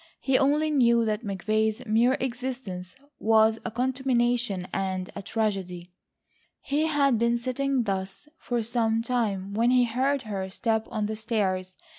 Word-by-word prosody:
He 265 - 0
only 295 +3 +3
knew 235 -5 +4
that 215 +1 -1
McVay's 215 +3 -1
mere 235 +4 +3
existence 245 -8 -5 0.2
was 220 0 +4
a - - -3
contamination 240 -5 0
and 190 -1 -2
a 200 - -5
tragedy. 190 -5 -3 0.7
He 300 +3 0
had 280 -6 +2
been 235 +1 +2
sitting 260 +2 -1
thus 195 +4 -4
for 240 -2 -2
some 225 -1 0
time, 205 -6 -1
when 230 +3 +2
he 250 0 +5
heard 260 +4 0
her 195 -4 -4
step 220 +2 -1
on 215 - -2
the 215 +1 -3
stairs. 190 -5 -2
225 Hz, 145 wpm, -26 LUFS, 200-250 Hz, 0.7 s, he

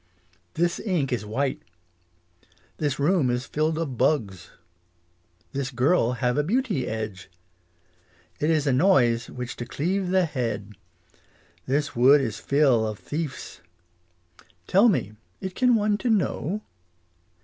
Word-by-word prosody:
This 175 +1 0
ink 165 - -1
is 110 -3 -3
white. 130 +5 -1 1.2
This 145 -3 -1
room 150 -2 +2
is 125 +1 -1
filled 155 +2 -1
of 145 -7 -4
bugs. 100 - 0 1.0
This 135 -1 -3
girl 125 0 +2
have 125 +2 0
a - - +2
beauty 210 - 0
edge. 110 -4 -5 1.1
It 150 - +1
is 155 -3 +2
a 135 - +2
noise 125 -7 +3
which 125 -1 -6
to 120 - -5
cleave 180 +8 -1
the 185 -1 +3
head. 115 -9 -3 0.9
This 145 +2 -1
wood 130 +5 +6
is 115 -6 -3
fill 135 -6 +2
of 110 -1 -5
thief's. 150 +2 -6 1.0
Tell 200 - +5
me, 110 - 0 0.3
it 190 -1 -5
can 250 +2 +3
one 210 -1 +1
to 245 - -1
know 210 -2 0
140 Hz, 130 wpm, -25 LUFS, 120-175 Hz, 1.2 s, wood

